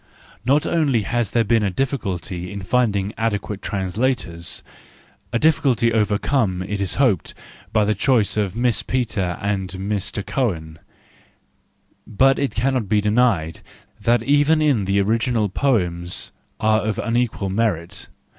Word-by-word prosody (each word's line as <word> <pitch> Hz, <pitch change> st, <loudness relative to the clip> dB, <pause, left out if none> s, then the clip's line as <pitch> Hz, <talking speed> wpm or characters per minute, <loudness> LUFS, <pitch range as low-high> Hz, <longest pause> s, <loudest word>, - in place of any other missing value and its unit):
Not 140 Hz, +5 st, +2 dB
only 145 Hz, -10 st, +1 dB
has 120 Hz, +2 st, -1 dB
there 115 Hz, -, +2 dB
been 115 Hz, +1 st, +2 dB
a 100 Hz, -, +1 dB
difficulty 95 Hz, -, -3 dB
in 100 Hz, -1 st, -6 dB
finding 105 Hz, -2 st, +1 dB
adequate 105 Hz, -2 st, -2 dB
translators—a 95 Hz, 0 st, -4 dB
difficulty 130 Hz, -5 st, +2 dB
overcome, 105 Hz, -2 st, +1 dB
it 100 Hz, +1 st, -3 dB
is 95 Hz, -, -1 dB
hoped, 120 Hz, -, +1 dB, 0.4 s
by 110 Hz, -, +3 dB
the 110 Hz, -, +2 dB
choice 110 Hz, +1 st, +2 dB
of 100 Hz, -3 st, -1 dB
Miss 120 Hz, -1 st, +1 dB
Petre 105 Hz, -8 st, -1 dB
and 100 Hz, -2 st, -2 dB
Mr 100 Hz, +1 st, -3 dB
Cohn,—but 105 Hz, +5 st, -3 dB
it 140 Hz, -, -1 dB
cannot 125 Hz, -3 st, 0 dB
be 105 Hz, -, +3 dB
denied 105 Hz, -7 st, +1 dB, 0.4 s
that 120 Hz, -1 st, +2 dB
even 145 Hz, +4 st, +3 dB
in 140 Hz, -10 st, +2 dB
the 100 Hz, +1 st, +1 dB
original 110 Hz, +1 st, +1 dB
the -, -, -23 dB
poems 90 Hz, -10 st, 0 dB, 0.3 s
are 110 Hz, 0 st, +3 dB
of 110 Hz, -2 st, -2 dB
unequal 115 Hz, -4 st, -1 dB
merit. 100 Hz, -3 st, -1 dB
110 Hz, 130 wpm, -21 LUFS, 95-125 Hz, 0.4 s, by